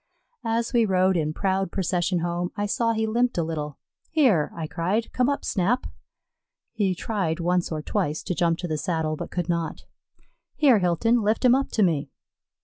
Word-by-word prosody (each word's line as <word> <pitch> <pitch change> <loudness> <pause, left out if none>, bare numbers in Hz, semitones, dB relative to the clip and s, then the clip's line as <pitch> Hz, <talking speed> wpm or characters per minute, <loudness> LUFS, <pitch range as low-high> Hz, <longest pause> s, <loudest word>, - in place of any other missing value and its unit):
As 230 +2 0
we 235 -1 +4
rode 190 -2 +2
in 155 -3 0
proud 190 +2 -1
procession 180 -1 0
home, 175 +1 -1
I 205 0 -1
saw 230 +2 +1
he 220 0 0
limped 240 +1 +1
a 170 - +2
little. 150 -3 -4 0.3
"Here," 250 - +3
I 165 - -4
cried, 185 +8 -2
"come 250 +1 +2
up, 285 - -2
Snap." 205 +7 +1 0.9
He 200 -5 0
tried 180 -5 -2
once 175 +1 0
or 155 -1 -3
twice 150 +1 -1
to 185 - -2
jump 165 0 +1
to 175 - -4
the 155 -2 -2
saddle, 160 -3 -1
but - - -6
could 175 -2 -3
not. 170 -2 -2 0.7
"Here, 265 -8 +5
Hilton, 200 +7 +2
lift 215 +4 +1
him 245 - +7
up 270 +1 +1
to 215 - +3
me." 155 -6 +1
185 Hz, 185 wpm, -25 LUFS, 165-225 Hz, 0.9 s, him